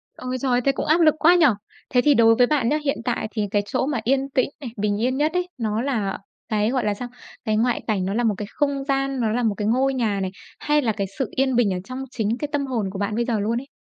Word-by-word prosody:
Ôi, 255 0 -4
trời 265 - 0
ơi! 245 0 +3
Thế 275 - +5
cũng - - -4
áp 320 +3 +3
lực 310 -2 +5
quá 345 +3 +6
nhỉ. 335 -3 +5 0.4
Thế 250 - +3
thì 295 +2 +4
đối 225 -3 +5
với 245 0 +4
bạn 275 -6 +1
nha, 300 - +2
hiện 275 - +1
tại 235 -3 -1
thì 210 -3 -2
cái 205 -1 +2
chỗ 255 - -1
mà 275 -5 -1
yên 270 +2 +1
tĩnh 260 -1 +1
này, 250 - -5
bình 205 0 0
yên 255 +3 +1
nhất 305 +3 +1
ấy, 360 0 0
nó 220 -1 -1
là 220 -8 -1 0.3
cái, 215 0 +1
gọi 255 -3 0
là, 210 - +1
sao? 245 +4 -6 0.4
Cái 215 -1 +1
ngoại 240 +2 +1
cảnh, 195 -4 0
nó 195 - -2
là 240 +3 0
một 215 -3 +2
cái 210 - -5
không 280 -2 -1
gian, 275 -1 -1
nó 220 - +1
là 245 +2 0
một 215 -3 +1
cái 210 -1 -1
ngôi 265 +4 +2
nhà 220 -6 0
này 190 -1 -2 0.3
hay 295 0 +2
là 230 -4 +1
cái 200 -2 -3
sự 265 - 0
yên 265 -1 +1
bình 215 -6 +3
ở 180 - -3
trong 255 +4 -6
chính 225 0 -1
cái 295 - -3
tâm 290 -2 0
hồn 240 -6 -2
của 195 - -6
bạn 205 +1 -1
bây 235 +1 0
giờ 230 -3 0
luôn 225 +3 0
ấy? 275 - -14
245 Hz, 295 wpm, -23 LUFS, 215-275 Hz, 0.4 s, quá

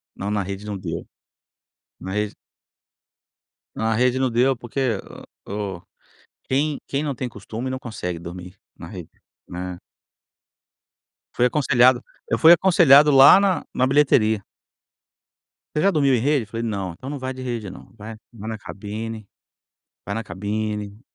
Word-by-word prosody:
Não, 100 - -4
na 105 -1 0
rede 100 +2 -6
não 105 -2 -4
deu, - - -6 0.9
na 95 - -6
rede 105 0 -2 1.4
Na 110 0 0
rede 125 +2 +2
não 130 -1 +1
deu 125 +3 +2
porque 120 -2 -2 0.5
o 100 -3 -4 0.6
quem 145 +2 0
quem 140 +2 -1
não 145 -3 -2
tem 125 +1 -4
costume 115 +3 -6
não 130 0 -4
consegue 90 -8 -5
dormir, 90 +2 -9 0.2
na - - -9
rede, - - -9 0.4
não 90 - -7
é. 90 - -10 1.6
Fui 125 - +3
aconselhado 130 -2 +3 0.3
eu - - +1
fui 165 +1 +8
aconselhado, 155 -5 +6
lá 135 +6 +9
na 195 -2 +1
na 130 - +2
bilheteria. 130 -7 +3 1.3
Você 150 - +1
já 195 - +4
dormiu 140 -5 +2
em 120 - +3
rede? 140 +1 +1
Eu - - -13
falei 115 +1 -5
não, 100 -5 -3
então 130 +11 -9
não 145 - -4
vai 130 0 -4
de 130 - -9
rede 120 -5 -4
não, - - -13
vai 110 +2 -8 0.2
vai 110 -2 -9
na 110 - -4
cabine 110 +1 -7 0.8
vai 100 - -3
na 115 - -3
cabine. 105 +1 -4
115 Hz, 155 wpm, -22 LUFS, 105-135 Hz, 1.6 s, lá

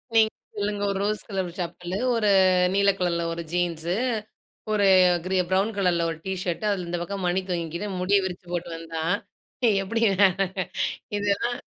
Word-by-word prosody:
நீங்க 220 -1 +5 0.3
சொல்லுங்க 205 0 -1
ஒரு 195 - -2
ரோஸ் 210 +1 -1
கலர் 190 -3 -2
செப்பலு, 175 +1 -4 0.2
ஒரு 215 -2 +2 0.5
நீல 200 0 +4
கலர்ல 170 -2 0
ஒரு 170 0 -5
ஜீன்ஸு, 175 -1 -1 0.8
ஒரு 205 -2 +3 0.4
கிரீ 190 0 0
ப்ரவுன் 195 +4 +2
கலர்ல 175 -3 +2
ஒரு 165 - -6
டீ 190 - -1
ஷர்ட், 180 +3 -2
அதுல 185 -3 -2
இந்த 175 0 -2
பக்கம் 195 +1 -4
மணி 180 +2 +1
தொங்கிக்கின்னு, 175 +3 -3
முடிய 195 +3 +3
விரிச்சு 180 -1 -6
போட்டு 175 0 -3
வந்தா! 165 -1 -5 0.8
எப்படி 225 +4 -2 1.2
இதெல்லாம். 205 +4 0
185 Hz, 150 wpm, -25 LUFS, 175-200 Hz, 1.2 s, நீங்க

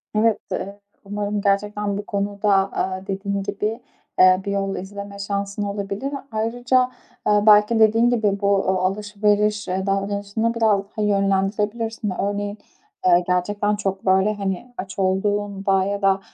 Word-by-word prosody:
Evet, 215 -1 +3
eee, 200 +1 -4 0.3
umarım 205 0 -2
gerçekten 205 0 0
bu 205 - -5
konuda, 200 +1 -1 0.2
aaa, 190 +1 -3
dediğin 200 0 -2
gibi, 215 +4 -3 0.4
ııı, 185 0 +6
bir 200 - -3
yol 195 -1 -1
izleme 200 +1 -7
şansın 200 0 -3
olabilir. 200 +6 -4 0.2
Ayrıca, 245 +3 +1 0.4
ııı, 210 0 +3
belki 210 +2 +6
dediğin 225 +2 +5
gibi 210 -4 +1
bu, 200 - +1
uuu, 195 -2 +2
alışveriş, 210 +1 0
eee, 190 +1 -2
davranışını 200 +3 -1
biraz 220 -4 +2
daha - - -1
yönlendirebilirsin. 205 +2 0
Örneğin, 205 +1 -2 0.5
ııı, 175 0 +5
gerçekten 205 +3 0
çok, 195 -2 -3
böyle, 190 +2 +3
hani, 200 +4 -4
aç 195 +1 -6
olduğunda 195 0 +1
ya 200 +1 -2
da, 195 0 +3
200 Hz, 140 wpm, -22 LUFS, 195-210 Hz, 0.5 s, ııı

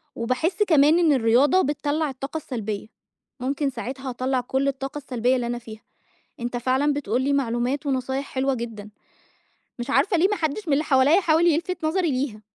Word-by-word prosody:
وباحس 315 - 0
كمان 315 -3 +4
إن 325 -4 +4
الرياضة 260 +8 +4
بتطلّع 295 +1 -1
الطاقة 275 +3 -5
السلبيّة، 220 -9 -5 0.5
ممكن 275 +3 -1
ساعتها 260 +1 -6
أطلّع 255 +1 -1
كلّ 265 +3 -1
الطاقة 275 +1 -3
السلبيّة 255 -3 0
اللي 245 -2 -2
أنا 240 0 -3
فيها، 220 -2 -11 0.6
أنت 240 +1 -3
فعلًا 260 +4 +1
بتقول 260 -4 -1
لي 280 +2 +1
معلومات 265 +2 -1
ونصايح 265 0 -1
حلوة 270 +1 +1
جدًا، 225 -4 -7 0.9
مش 240 +3 -5
عارفة 360 +6 +2
ليه 345 +4 +4
ما 415 - -1
حدش 335 +3 -3
من 300 - +2
اللي 290 +3 +2
حواليّا 285 +6 +4
حاول 330 0 +3
يلفت 340 +2 0
نظري 335 0 +1
ليها. 255 -5 -2
270 Hz, 170 wpm, -24 LUFS, 245-305 Hz, 0.9 s, كمان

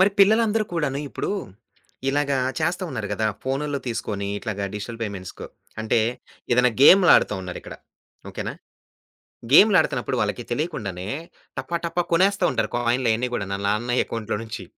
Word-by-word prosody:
మరి 195 +2 +6
పిల్లలందరు 220 +2 +4
కూడాను 150 -5 -1
ఇప్పుడు - - -4 0.8
ఇలాగ 140 +1 0 0.3
చేస్తా 170 +4 0
ఉన్నారు 105 -2 -4
గదా! 110 - 0 0.2
ఫోనుల్లో 140 +2 -2
తీసుకొని 105 -4 -3
ఇట్లాగా 100 -1 -4
డిజిటల్ 110 +3 -6
పేమెంట్స్‌కు. 100 -4 -6 0.4
అంటే, 110 +1 +2 0.5
ఏదన్నా 125 +1 +4
గేమ్‌లాడుతా 180 - +7
ఉన్నారు 90 -1 -6
ఇక్కడ. - - -9 0.5
ఓకే - - -5
నా. - - -3 1.0
గేమ్‌లాడుతున్నప్పుడు 195 +1 +5
వాళ్ళకి - - -1
తెలియకుండానే 105 - -3 0.5
టపా 135 +6 -2
టపా 170 +1 0
కొనేస్తా 190 +2 +3
ఉంటారు - - -1
కాయిన్‌లు 120 0 +1
అయన్నీ 120 +3 -1
గూడాను 100 -3 -2
ఆళ్ళ 100 - -3
నాన్న 120 +4 0
అకౌంట్‌లో 110 -2 -3
నుంచి. 115 -3 -7
125 Hz, 140 wpm, -23 LUFS, 105-165 Hz, 1.0 s, గేమ్‌లాడుతా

